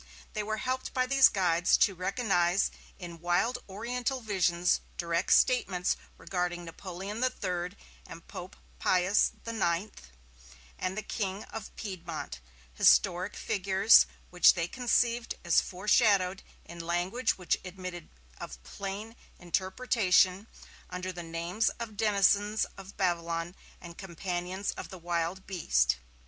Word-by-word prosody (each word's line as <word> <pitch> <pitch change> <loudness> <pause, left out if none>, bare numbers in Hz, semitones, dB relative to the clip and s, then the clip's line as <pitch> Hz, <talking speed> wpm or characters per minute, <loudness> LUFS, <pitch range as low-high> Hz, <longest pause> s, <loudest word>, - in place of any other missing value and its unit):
They 215 - -1
were 215 +1 -2
helped 255 +3 -3
by 255 -1 +2
these 270 +1 +6
guides 175 -3 +3
to 200 - +4
recognize 185 -1 +1 0.3
in 170 -2 -9
wild 175 +8 +1
Oriental 245 +6 -2
visions 180 -6 +1 0.2
direct 170 0 -1
statements 195 -8 +3 0.2
regarding 175 -1 -3
Napoleon 195 +6 -6
III 180 -8 -2 0.3
and - - -11
Pope - - -8 0.2
Pius 185 - +3
IX 200 -3 -1 0.9
and 185 +2 -2
the 215 - -3
King 195 -1 -3
of 220 - -6
Piedmont, 185 - -6 0.3
historic 180 - +4
figures 195 +2 +4 0.2
which 180 0 +6
they 170 -1 -1
conceived 240 0 +1
as 170 - +5
foreshadowed, 195 -1 +2 0.2
in 170 0 -10
language 175 +9 0
which 180 -2 0
admitted 185 -2 -7 0.3
of - - -8
plain 200 - -6 0.2
interpretation, 190 +1 +2 0.4
under 180 +1 -4
the 175 -1 -7
names 170 +5 -1
of 225 -2 -6
denizens 205 0 +3
of 195 0 -12
Babylon 170 -2 -1 0.3
and 170 -1 -11
companions 185 +1 -3
of - - -8
the 185 - -9
Wild 175 +2 -2
Beast. 65 - +1
185 Hz, 120 wpm, -30 LUFS, 175-210 Hz, 0.9 s, these